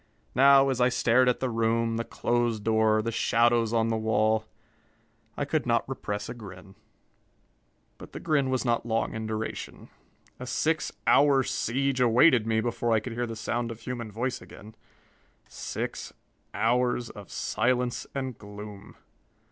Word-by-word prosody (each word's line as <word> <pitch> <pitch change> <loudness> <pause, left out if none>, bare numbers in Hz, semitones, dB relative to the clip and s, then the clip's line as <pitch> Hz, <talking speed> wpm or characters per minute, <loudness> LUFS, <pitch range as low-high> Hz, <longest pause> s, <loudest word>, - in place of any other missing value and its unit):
Now, 135 +1 +6
as 130 -2 -1
I 125 - +5
stared 125 0 +3
at 125 - -1
the 130 - 0
room, 115 0 0
the 115 - -1
closed 120 -3 -1
door, 110 -1 +2
the 115 - -2
shadows 115 0 +2
on 115 -1 +1
the 115 - 0
wall, 110 0 +1 0.9
I - - -1
could - - -1
not - - +1
repress 105 0 -4
a - - -5
grin. 95 -4 -11 1.3
But - - -11
the - - -7
grin 150 -5 +1
was 130 0 -1
not 120 -1 +1
long 115 -1 -1
in 110 0 -4
duration. 110 0 -5 0.5
A 125 - -7
six 155 +3 0
hour 140 -2 +5
siege 130 +2 -1
awaited 120 0 +5
me 110 0 +1
before 120 0 -1
I 110 - +4
could 115 +2 -7
hear 120 +1 -2
the 115 - -6
sound 120 +2 -2
of 115 0 -8
human 115 -2 -5
voice 120 +4 -3
again 110 +1 -13 0.7
six - - -5 0.4
hours 120 +1 0
of 100 -2 -12
silence 120 +2 -1
and 130 -3 -3
gloom. 105 -1 -11
115 Hz, 155 wpm, -27 LUFS, 110-125 Hz, 1.3 s, Now